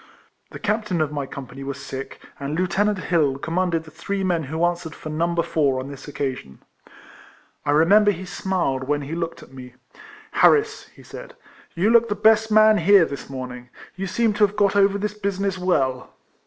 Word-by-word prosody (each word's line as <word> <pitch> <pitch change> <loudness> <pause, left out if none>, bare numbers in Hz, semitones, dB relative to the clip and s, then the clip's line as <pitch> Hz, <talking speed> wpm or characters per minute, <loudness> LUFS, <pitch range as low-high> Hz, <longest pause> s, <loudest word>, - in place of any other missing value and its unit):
The - - -9
captain 210 -4 -1
of 155 -2 0
my 145 -2 -4
company 135 0 -9
was 140 0 -5
sick, 135 -1 -7 0.2
and 145 +2 -4
Lieutenant 195 +3 +1
Hill 155 -7 +1
commanded 170 +2 -1
the 155 - -14
three 195 +5 -4
men 175 -4 0
who 160 +5 -1
answered 175 -2 -3
for 155 - -8
No. 170 +2 -1
4 145 -5 +1
on 130 +2 -6
this 140 0 -10
occa 140 -2 -2
sion. 65 - -13 1.1
I - - 0
remember 185 +8 +5
he 190 -2 -2
smiled 175 -7 -2
when 145 0 0
he 140 +3 -6
looked 170 0 -4
at - - -17
me. 125 -2 -11 0.3
" - - -20
Harris," 440 0 +3
he - - -18
said, - - -11 0.2
" - - -27
you 190 +6 +2
look 235 0 +4
the 205 - -1
best 220 +1 +3
man 215 0 +6
here, 200 -4 +6
this 140 -2 -8
morning. 125 -2 -7 0.3
You 195 +1 -4
seem 225 +3 +1
to 210 +1 +1
have 200 - -13
got 205 -1 +2
over 200 0 +4
this 210 +1 -3
business 200 -2 -2
well." 135 -9 0
170 Hz, 195 wpm, -22 LUFS, 140-200 Hz, 1.1 s, man